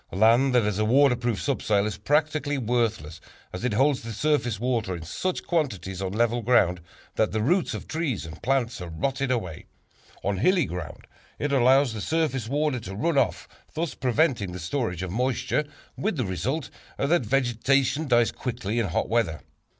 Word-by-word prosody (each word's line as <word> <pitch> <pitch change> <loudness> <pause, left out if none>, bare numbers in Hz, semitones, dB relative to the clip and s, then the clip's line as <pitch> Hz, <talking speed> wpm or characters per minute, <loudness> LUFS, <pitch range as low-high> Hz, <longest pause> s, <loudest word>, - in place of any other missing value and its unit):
Land 115 +7 +4
that 120 - +5
has 105 -1 -1
a - - +2
waterproof 120 -2 +3
subsoil 105 -7 +1
is 105 -4 -3
practically 150 -1 +1
worthless, 110 - -1 0.3
as 90 - -6
it 125 -3 0
holds 135 +4 +2
the 115 0 -6
surface 125 -4 0
water 115 -6 -1
in 85 - -7
such 180 - -3
quantities 100 - -2
on 95 -1 -2
level 120 +3 +1
ground, 100 -7 +3 0.4
that 110 - +2
the 110 - 0
roots 175 - +1
of - - -7
trees 155 - -2
and 80 0 -10
plants 130 -6 0
are 90 - -6
rotted 135 - -2
away; 110 -11 -3 0.6
on 100 -1 0
hilly 180 - +3
ground, 85 - -7 0.3
it 145 - -2
allows 135 -1 +4
the 110 - -5
surface 150 -7 -1
water 145 -1 0
to 95 -3 -8
run 145 +7 +1
off, 125 - -1 0.3
thus 165 0 -2
preventing 125 - +1
the 90 - -6
storage 90 - -2
of 95 - -4
moisture, 130 +6 0 0.3
with 205 -4 -2
the 125 - 0
result 115 - -3 0.3
that 165 +5 +2
vegetation 135 +4 +1
dies 120 -3 +3
quickly 120 -3 -3
in 115 - 0
hot 85 - -1
weather. 110 -10 0
120 Hz, 175 wpm, -26 LUFS, 105-140 Hz, 0.6 s, that